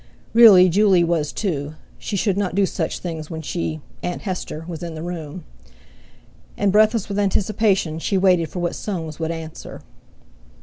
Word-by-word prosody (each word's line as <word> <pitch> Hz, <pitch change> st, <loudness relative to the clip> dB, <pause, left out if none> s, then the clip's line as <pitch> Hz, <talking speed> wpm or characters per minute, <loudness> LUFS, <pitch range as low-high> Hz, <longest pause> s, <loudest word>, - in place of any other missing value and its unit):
Really 215 Hz, -6 st, +8 dB
Juley 190 Hz, -1 st, +4 dB
was 165 Hz, -3 st, 0 dB
too—she 155 Hz, +1 st, -5 dB
should 195 Hz, 0 st, +1 dB
not 195 Hz, -3 st, -2 dB
do 200 Hz, 0 st, +3 dB
such 170 Hz, -3 st, -3 dB
things 160 Hz, -3 st, -6 dB
when 160 Hz, -1 st, -6 dB
she—Aunt 165 Hz, +2 st, -5 dB
Hester, 180 Hz, -5 st, -5 dB
was 165 Hz, -3 st, -6 dB
in 170 Hz, -2 st, -6 dB
the 155 Hz, -, -6 dB
room; 170 Hz, -1 st, -6 dB, 1.1 s
and, 200 Hz, -1 st, +2 dB
breathless 215 Hz, +1 st, +3 dB
with 200 Hz, 0 st, -3 dB
anticipation, 195 Hz, -4 st, +1 dB
she 195 Hz, +4 st, 0 dB
waited 180 Hz, -4 st, +3 dB
for -, -, -9 dB
what 175 Hz, -, -1 dB
Soames 165 Hz, -7 st, -5 dB
would 160 Hz, -1 st, -2 dB
answer. 165 Hz, -1 st, -7 dB
175 Hz, 150 wpm, -21 LUFS, 160-195 Hz, 1.1 s, Really